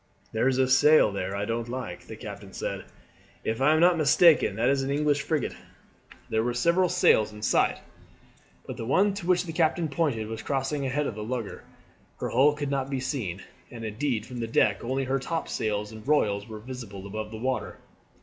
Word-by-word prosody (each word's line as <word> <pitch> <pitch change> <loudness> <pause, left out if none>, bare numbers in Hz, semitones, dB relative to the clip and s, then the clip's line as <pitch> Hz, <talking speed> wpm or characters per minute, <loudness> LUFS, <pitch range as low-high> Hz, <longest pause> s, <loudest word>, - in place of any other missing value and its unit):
"There 110 +3 +1
is 130 -1 +2
a 130 -1 +3
sail 145 -2 +5
there 95 0 -3
I 100 +1 -2
don't 115 +1 -3
like," 125 -9 -6
the 110 - -8
captain 100 -2 -9
said. - - -4 0.6
"If 110 +3 -2
I 140 +3 +5
am 155 - +3
not 175 0 +5
mistaken 155 - +5
that 115 +3 +1
is 135 0 +2
an 135 - -3
English 145 0 +1
frigate." 155 -2 -1 0.7
There 110 0 0
were 120 0 -1
several 170 +8 +3
sails 110 -11 +3
in 105 0 -11
sight, - - +2 0.9
but - - -7
the 115 - -5
one 195 +9 +3
to 195 -3 -6
which 180 0 +3
the 165 - -6
captain 165 0 +1
pointed 140 -7 0
was 110 +1 -6
crossing 135 0 -2
ahead 145 +3 -1
of 125 - -2
the 105 +1 -6
lugger. 115 -2 -5 0.5
Her - - -2
hull 140 +5 +4
could 145 -1 -4
not 135 -1 -1
be 135 -1 -2
seen, 110 - -3 0.3
and 115 -2 -8
indeed 110 0 -2
from 125 -1 -8
the 115 - -2
deck 105 -3 +2
only 130 +3 -1
her 135 +1 0
topsails 110 -8 -2
and 110 +1 -11
royals 105 -9 +1
were 110 -1 -8
visible 105 -4 -8
above 105 +1 -5
the 110 - -7
water. 130 +3 -3
130 Hz, 205 wpm, -27 LUFS, 110-145 Hz, 0.9 s, sail